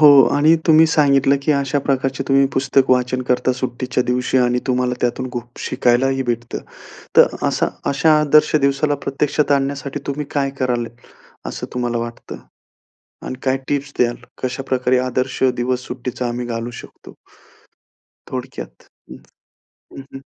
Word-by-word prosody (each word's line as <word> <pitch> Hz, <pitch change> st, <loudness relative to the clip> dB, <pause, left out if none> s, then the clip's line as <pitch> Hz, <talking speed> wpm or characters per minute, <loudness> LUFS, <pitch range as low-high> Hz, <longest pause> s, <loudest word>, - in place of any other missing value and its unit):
हो, 150 Hz, -, +9 dB, 0.3 s
आणि 155 Hz, +3 st, +5 dB
तुम्ही 160 Hz, 0 st, +6 dB
सांगितलं, 140 Hz, -3 st, +3 dB
की 150 Hz, -, +2 dB
अशा 140 Hz, 0 st, 0 dB
प्रकारचे 135 Hz, -1 st, -1 dB
तुम्ही 135 Hz, 0 st, +4 dB
पुस्तक 135 Hz, 0 st, +2 dB
वाचन 130 Hz, 0 st, +1 dB
करता 125 Hz, +1 st, +2 dB
सुट्टीच्या 125 Hz, 0 st, -2 dB
दिवशी 125 Hz, +1 st, 0 dB
आणि 125 Hz, 0 st, +2 dB
तुम्हाला 125 Hz, -1 st, 0 dB
त्यातून 125 Hz, +1 st, -1 dB
खूप 120 Hz, 0 st, -7 dB
शिकायलाही 130 Hz, +1 st, +1 dB
भेटत. 120 Hz, -1 st, -3 dB, 0.6 s
तर -, -, +9 dB, 0.2 s
अशा -, -, 0 dB, 0.2 s
अशा 155 Hz, +2 st, +3 dB
आदर्श 150 Hz, +1 st, +4 dB
दिवसाला 140 Hz, +1 st, +2 dB
प्रत्यक्षात 145 Hz, +1 st, 0 dB
आणण्यासाठी 140 Hz, 0 st, -1 dB
तुम्ही 145 Hz, +1 st, -3 dB
काय 140 Hz, -2 st, 0 dB
कराल, 125 Hz, -2 st, 0 dB, 0.6 s
असं -, -, -5 dB
तुम्हाला 120 Hz, -1 st, -1 dB
वाटतं 115 Hz, 0 st, -6 dB, 0.9 s
आणि -, -, -4 dB
काय 130 Hz, 0 st, +1 dB
टिप्स 140 Hz, 0 st, -2 dB
द्याल? 120 Hz, -1 st, +2 dB, 0.3 s
कशाप्रकारे 130 Hz, 0 st, 0 dB
आदर्श 130 Hz, +1 st, -2 dB
दिवस 125 Hz, +1 st, -2 dB
सुट्टीचा 125 Hz, 0 st, -4 dB
आम्ही 120 Hz, +1 st, -4 dB
घालू 115 Hz, 0 st, -4 dB
शकतो? -, -, -15 dB, 1.2 s
थोडक्यात, -, -, -7 dB, 0.3 s
हं, 65 Hz, -, -15 dB, 0.6 s
हं. 135 Hz, 0 st, -11 dB
130 Hz, 135 wpm, -19 LUFS, 125-140 Hz, 1.2 s, हो